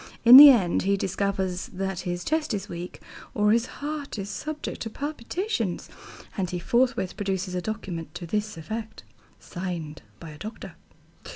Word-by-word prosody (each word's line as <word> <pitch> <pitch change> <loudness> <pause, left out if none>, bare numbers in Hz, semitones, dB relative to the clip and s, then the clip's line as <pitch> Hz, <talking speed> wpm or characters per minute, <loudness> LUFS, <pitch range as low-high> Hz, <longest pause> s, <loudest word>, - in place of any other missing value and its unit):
In 240 +2 +11
the 290 +1 +13
end 195 -10 +3
he 200 +1 +1
discovers 190 -1 -2
that 190 -1 -4
his 175 0 -3
chest 310 -7 -1
is 195 -1 -5
weak, 175 +1 -7 0.4
or 210 0 +3
his 230 +1 +2
heart 290 -3 -6
is 200 0 -5
subject 305 +5 -5
to 225 - -3
palpitations, 280 - -3 0.5
and 190 -4 -2
he 180 - -3
forthwith 235 0 0
produces 190 -2 -3
a 180 - -2
document 180 -5 -6
to 175 - -6
this 210 +2 -3
effect, 220 +7 -6 0.4
signed 175 -4 -6 0.2
by 165 -2 -9
a 150 - -13
doctor. 215 +4 -8
200 Hz, 160 wpm, -26 LUFS, 180-235 Hz, 0.5 s, the